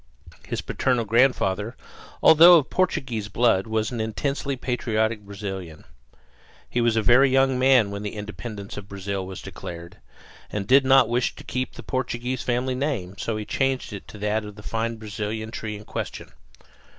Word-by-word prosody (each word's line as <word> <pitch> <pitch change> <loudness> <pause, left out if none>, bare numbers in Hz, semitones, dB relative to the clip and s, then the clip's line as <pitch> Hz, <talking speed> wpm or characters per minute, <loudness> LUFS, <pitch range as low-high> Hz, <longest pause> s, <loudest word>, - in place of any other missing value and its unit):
His - - -3
parental 125 -3 0
grandfather, 115 -2 +2 0.5
although 170 +2 +9
of 145 -3 -1
Portuguese 125 - -1
blood, 115 -2 +2
was 110 +1 -1
an 120 -2 -3
intensely 140 +5 -2
patriotic 115 -3 -1
Brazilian. 95 -5 -7 0.8
He 120 - -1
was 115 -1 +2
a 110 - +1
very 130 +4 +6
young 135 -1 +3
man 130 -6 +4
when 100 0 -5
the 105 0 -5
independence 105 0 -7
of 100 -1 -7
Brazil 100 -1 -4
was 95 -1 -8
declared, 85 0 -8 0.5
and 105 -2 -3
did 135 +5 +5
not 135 -2 +6
wish 120 +1 0
to - - -11
keep 130 0 -3
the - - -9
Portuguese 125 -1 -2
family 125 +1 -1
name; 125 -9 -2
so 115 -2 -2
he 105 - -5
changed 135 -2 -1
it 100 - -8
to - - -11
that 105 +1 -1
of 105 -1 -9
the 105 - -12
fine 115 +1 -2
Brazilian 110 0 -5
tree 110 -2 -5
in 105 - -12
question. - - -6
110 Hz, 170 wpm, -24 LUFS, 105-130 Hz, 0.8 s, although